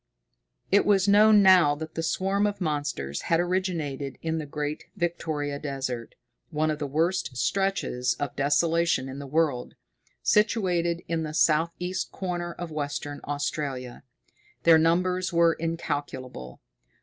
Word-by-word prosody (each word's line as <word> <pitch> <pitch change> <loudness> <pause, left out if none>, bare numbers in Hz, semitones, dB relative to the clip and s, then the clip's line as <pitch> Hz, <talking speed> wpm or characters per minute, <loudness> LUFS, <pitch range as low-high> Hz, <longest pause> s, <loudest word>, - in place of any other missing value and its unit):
It 200 - +5
was 200 -1 +3
known 210 0 +6
now 180 -6 +6
that 160 +1 -7
the 165 - -3
swarm 195 +5 +1
of 205 - -4
monsters 145 - -2
had 165 - +3
originated 170 -7 -2
in 160 0 -1
the 150 - -5
Great 150 +1 -4
Victoria 155 -5 -2
Desert, 135 -5 -4 0.3
one 155 -1 0
of 150 - -4
the 145 - -2
worst 160 -1 -1
stretches 190 -10 0
of 145 -3 -4
desolation 160 +1 +2
in 135 +1 -7
the 140 - -7
world, 145 -4 0 0.5
situated 180 -6 +2
in 165 -1 -1
the 155 -1 -4
south 165 +1 +3
east 185 +1 -3
corner 175 -2 -3
of 175 -1 -7
Western 145 -1 -4
Australia. 140 -3 -3 0.6
Their 165 -1 +7
numbers 180 +3 +1
were 170 -1 +4
incalculable. 145 - -5
160 Hz, 135 wpm, -26 LUFS, 145-180 Hz, 0.6 s, Their